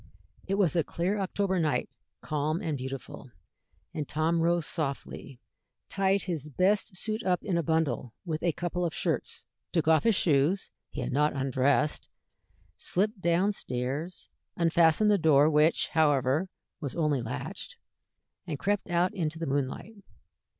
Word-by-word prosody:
It 195 Hz, -, 0 dB
was 190 Hz, -5 st, +2 dB
a 165 Hz, -, +3 dB
clear 185 Hz, +7 st, -1 dB
October 190 Hz, -1 st, 0 dB
night, 155 Hz, -3 st, 0 dB, 0.3 s
calm 155 Hz, +2 st, -1 dB
and 165 Hz, -7 st, -2 dB
beautiful, 130 Hz, 0 st, -7 dB, 0.6 s
and 150 Hz, -3 st, -3 dB
Tom 160 Hz, +2 st, +1 dB
rose 170 Hz, -1 st, +2 dB
softly, 140 Hz, -4 st, -4 dB, 0.5 s
tied 195 Hz, 0 st, +1 dB
his 155 Hz, -5 st, -4 dB
best 185 Hz, +5 st, +1 dB
suit 215 Hz, +3 st, -2 dB
up 180 Hz, -2 st, +1 dB
in 190 Hz, -5 st, -1 dB
a 170 Hz, -, +2 dB
bundle 155 Hz, -7 st, 0 dB
with 160 Hz, -2 st, -3 dB
a 170 Hz, -, +2 dB
couple 175 Hz, +2 st, -3 dB
of 170 Hz, -, -2 dB
shirts, -, -, -2 dB, 0.3 s
took 165 Hz, -3 st, 0 dB
off 160 Hz, -2 st, +5 dB
his 225 Hz, -3 st, +4 dB
shoes 160 Hz, +3 st, +2 dB, 0.2 s
he -, -, -5 dB
had -, -, -3 dB
not 150 Hz, +2 st, +2 dB
undressed 135 Hz, +2 st, +1 dB, 0.7 s
slipped 205 Hz, +2 st, -1 dB
down 175 Hz, +4 st, +2 dB
stairs, 140 Hz, +2 st, -4 dB, 0.3 s
unfastened 170 Hz, +4 st, +4 dB
the 205 Hz, -, +3 dB
door, 150 Hz, -3 st, +5 dB
which, 150 Hz, +2 st, +3 dB
however, 150 Hz, +2 st, +2 dB, 0.3 s
was 140 Hz, -4 st, -5 dB
only 150 Hz, -6 st, +1 dB
latched, 115 Hz, +2 st, -6 dB, 0.7 s
and 150 Hz, -, -3 dB
crept 200 Hz, +4 st, -1 dB
out 175 Hz, +1 st, +2 dB
into 160 Hz, -4 st, -2 dB
the 165 Hz, -, -3 dB
moonlight. 140 Hz, +9 st, -2 dB
160 Hz, 150 wpm, -29 LUFS, 145-185 Hz, 0.7 s, off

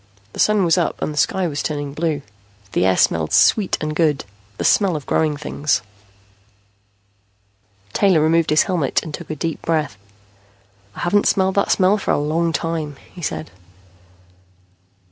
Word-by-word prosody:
The -, -, -10 dB
Sun 210 Hz, -3 st, +3 dB
was 170 Hz, +1 st, +3 dB
up 170 Hz, -, -1 dB
and 155 Hz, -, -3 dB
the -, -, -10 dB
sky 185 Hz, +4 st, +1 dB
was 145 Hz, -3 st, -3 dB
turning 145 Hz, -2 st, -4 dB
blue. 155 Hz, -2 st, -2 dB, 0.5 s
The 95 Hz, -, +2 dB
air 95 Hz, -, +2 dB
smelled 80 Hz, -2 st, +2 dB
sweet 205 Hz, -4 st, +4 dB
and 155 Hz, 0 st, -3 dB
good, 150 Hz, -4 st, +1 dB, 0.3 s
the -, -, -3 dB
smell 195 Hz, -5 st, +3 dB
of 150 Hz, -, -5 dB
growing 155 Hz, -2 st, 0 dB
things. 145 Hz, -7 st, -1 dB, 2.1 s
Taylor 190 Hz, -5 st, +3 dB
removed 160 Hz, +1 st, +2 dB
his 155 Hz, -, +4 dB
helmet 170 Hz, -8 st, 0 dB
and 155 Hz, -, -8 dB
took 170 Hz, +2 st, -8 dB
a 155 Hz, -, -3 dB
deep 165 Hz, +2 st, -4 dB
breath. 155 Hz, -9 st, -1 dB, 1.0 s
"I -, -, -7 dB
haven't 200 Hz, +4 st, +2 dB
smelled 190 Hz, 0 st, +2 dB
that 200 Hz, -, +1 dB
smell 195 Hz, +2 st, +3 dB
for -, -, -5 dB
a -, -, +3 dB
long 160 Hz, +3 st, 0 dB
time," 165 Hz, -3 st, -3 dB, 0.2 s
he 180 Hz, -, -10 dB
said. 80 Hz, -, -4 dB
160 Hz, 165 wpm, -20 LUFS, 145-175 Hz, 2.1 s, sweet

